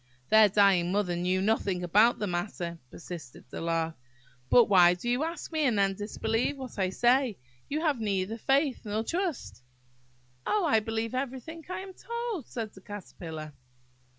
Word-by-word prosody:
"Their 220 -1 +7
dying 195 -3 +4
mother 195 -3 0
knew 180 +2 0
nothing 195 -4 0
about 210 +7 +4
the 210 - -2
matter," 175 -2 -3
persisted 165 -6 -9
the - - -6
Lark; 165 -1 -1 0.6
"but 240 - +7
why 180 -3 +6
do 180 +7 -7
you 245 +4 +1
ask 335 +2 -5
me, 315 -1 0
and 240 -6 +2
then 195 -1 +3
disbelieve 220 +6 -2
what 255 -5 -8
I 190 -1 +2
say? 240 +2 +2 0.3
You 305 +2 -1
have 300 -6 +1
neither 205 +1 -1
faith 275 +2 +1
nor 215 0 -2
trust." 335 - -3 0.8
"Oh, 415 -4 +1
I 250 -8 +4
believe 225 +1 -3
everything 265 +5 -4
I 370 - -4
am 385 0 -9
told," 470 - -5
said 225 -4 -5
the 190 - -14
Caterpillar. 165 -6 -8
215 Hz, 165 wpm, -29 LUFS, 185-265 Hz, 0.8 s, Their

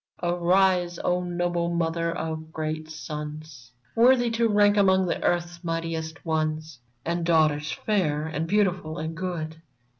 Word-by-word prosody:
Arise, 175 0 +2
O 180 0 +1
noble 175 -1 -1
mother 165 0 0
of 160 -1 -4
great 155 0 -4
sons, 150 -4 -7 0.2
Worthy 245 0 +5
to 230 0 +2
rank 205 -1 +4
among 190 -3 +4
earth's 175 0 -1
mightiest 165 -1 -3
ones, 155 -2 -2 0.3
And 170 +1 -1
daughters 155 -3 +2
fair 155 -8 0
and 160 +1 -3
beautiful 180 -5 +1
and 160 0 -4
good. 165 -3 -4
165 Hz, 125 wpm, -26 LUFS, 155-180 Hz, 0.3 s, Worthy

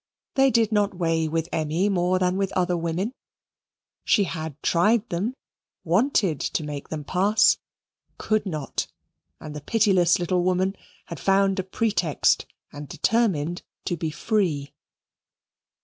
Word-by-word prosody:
They 270 -1 +4
did 230 -3 +2
not 205 -2 +1
weigh 165 -2 0
with 165 +1 -1
Emmy 160 +5 0
more 185 -2 +1
than 180 0 +1
with 195 0 -1
other 180 -1 +1
women. 170 +7 -2 0.9
She 205 - +3
had 160 -5 -5
tried 210 +6 +3
them; 200 +9 -2 0.5
wanted 190 - +2
to 160 - -2
make 145 -1 -6
them 155 -2 -4
pass; 200 +7 +3 0.6
could 215 -1 0
not; 155 -6 -3 0.5
and 150 -1 -8
the 150 - -6
pitiless 190 -3 +3
little 180 0 0
woman 185 +2 +1 0.3
had 170 - -8
found 195 0 +2
a - - 0
pretext, 190 -5 +1 0.3
and 145 0 -8
determined 175 -8 0 0.2
to 175 - -1
be 160 -1 -3
free. 155 -4 -1
180 Hz, 135 wpm, -24 LUFS, 160-205 Hz, 0.9 s, They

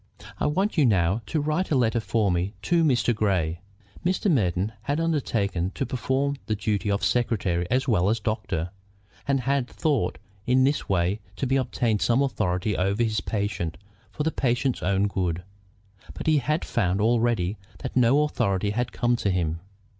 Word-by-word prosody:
"I - - +1
want 185 +4 0
you 145 - +5
now 95 0 +2
to 160 - 0
write 155 +5 0
a 150 - +2
letter 120 -2 +2
for 110 -3 +1
me 90 +4 -1
to 170 +5 +2
Mr. 125 -5 +3
Grey." 90 -6 0 0.4
Mr. 185 +2 +1
Merton 95 - +1
had 145 +7 -1
undertaken 115 - 0
to 135 - -1
perform 135 +3 -1
the 110 - 0
duties 105 0 -1
of 100 - -1
secretary 95 -8 +1
as 130 +3 +1
well 100 -6 +3
as 115 +1 +1
doctor, 105 -6 -2 0.6
and 135 -1 +2
had 135 -1 0
thought 145 -3 0 0.3
in 130 +1 +4
this 140 +2 0
way 95 +2 +1 0.2
to 135 +4 0
obtain 115 -4 0
some 120 +6 +3
authority 105 -6 -1
over 100 +6 +1
his 110 -2 0
patient 100 -6 -2 0.3
for 150 - -4
the 160 - +1
patient's 125 -1 0
own 100 +2 +2
good; 90 -3 -2 0.7
but - - -6
he 155 -2 +4
had 150 +4 -1
found 95 -4 0
already 110 -3 +1 0.2
that 130 - -6
no 130 +4 +4
authority 100 -9 0
had 120 +3 -1
come 120 0 +1
to 100 - 0
him. 85 -3 0
115 Hz, 170 wpm, -25 LUFS, 95-135 Hz, 0.7 s, you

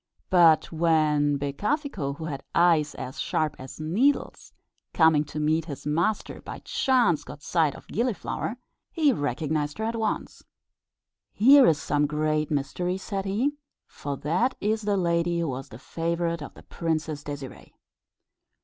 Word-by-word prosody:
But 170 -4 +5
when 155 -3 +2
Becafico, 145 - -2
who 160 - -6
had 140 -4 -4
eyes 165 -4 +3
as 130 0 -7
sharp 155 -2 -1
as 130 +3 -10
needles, 205 - 0 0.4
coming 160 -3 +5
to 150 - -6
meet 155 +1 +1
his 145 -4 -8
master, 170 +8 -1
by - - -7
chance 245 - +2
caught 145 - -11
sight 160 -5 +1
of - - -14
Gilliflower, 235 0 -2 0.3
he 305 -5 +3
recognised 145 - -2
her 220 - -3
at 225 +1 -1
once. 220 -1 -3 0.9
"Here 265 +5 +7
is 155 -2 +3
some 145 -1 +1
great 155 0 0
mystery," 155 +6 -1
said 195 0 -4
he, 225 +9 0 0.3
"for 140 -1 -6
that 180 - 0
is 215 +2 0
the 205 -1 0
lady 170 -1 +1
who 165 -3 -1
was 130 +1 -5
the 110 - -10
favourite 170 +4 -2
of 145 - -8
the - - -14
Princess 155 -3 -3
Désirée." 140 -3 -8
160 Hz, 150 wpm, -26 LUFS, 150-195 Hz, 0.9 s, Here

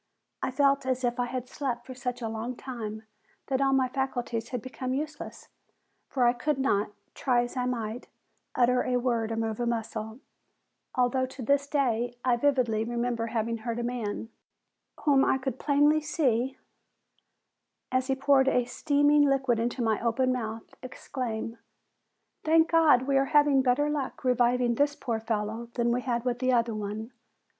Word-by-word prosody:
I - - -1
felt 275 +1 +2
as 260 0 0
if 245 0 0
I 245 - +1
had 255 0 -4
slept 250 -4 -4
for 260 - -8
such 250 -1 -4
a - - -1
long 225 +3 -4
time 220 -4 -6 0.5
that 265 0 +1
all 270 0 +3
my 265 -1 +3
faculties 245 -3 -3
had 250 - -3
become 255 +2 -4
useless, 300 +2 -6 0.6
for 255 -3 +1
I 240 - +5
could 295 +4 -1
not, 210 -7 +1 0.2
try 245 -3 +1
as 240 - -7
I 250 -1 -1
might, 230 -1 -4 0.5
utter 250 0 +3
a 250 -1 +1
word 235 -3 0
or - - -1
move 225 -1 -2
a 240 - 0
muscle, 225 0 -3 0.8
although 255 +1 +2
to 260 0 -9
this 280 +3 +2
day 245 -4 0
I 250 -2 +4
vividly 240 -4 +1
remember 235 0 -2
having 230 0 -2
heard 230 +1 -4
a 240 - -2
man, 230 -2 -3 0.7
whom 275 -3 +4
I - - +3
could 260 -1 -4
plainly 295 +1 +3
see 265 -4 0 1.3
as 255 0 +1
he 270 - +1
poured 270 0 +3
a 250 -2 +3
steaming 290 +3 +3
liquid 265 -4 +1
into 240 +2 -1
my 220 -2 +1
open 255 +2 +2
mouth, 225 -2 -5
exclaim: 235 -3 -5 0.8
"Thank 320 +1 +4
God 315 -6 +5
we 275 0 +2
are 270 - +2
having 290 -2 +5
better 260 +3 +2
luck 295 -3 -3
reviving 245 -1 +2
this 290 +4 +1
poor 230 -6 -3
fellow 220 +1 -3
than 235 -1 +1
we 245 +1 0
had 240 -1 -2
with 245 -1 -1
the 255 0 +2
other 235 -1 +2
one! 215 +2 -5
250 Hz, 170 wpm, -28 LUFS, 230-270 Hz, 1.3 s, I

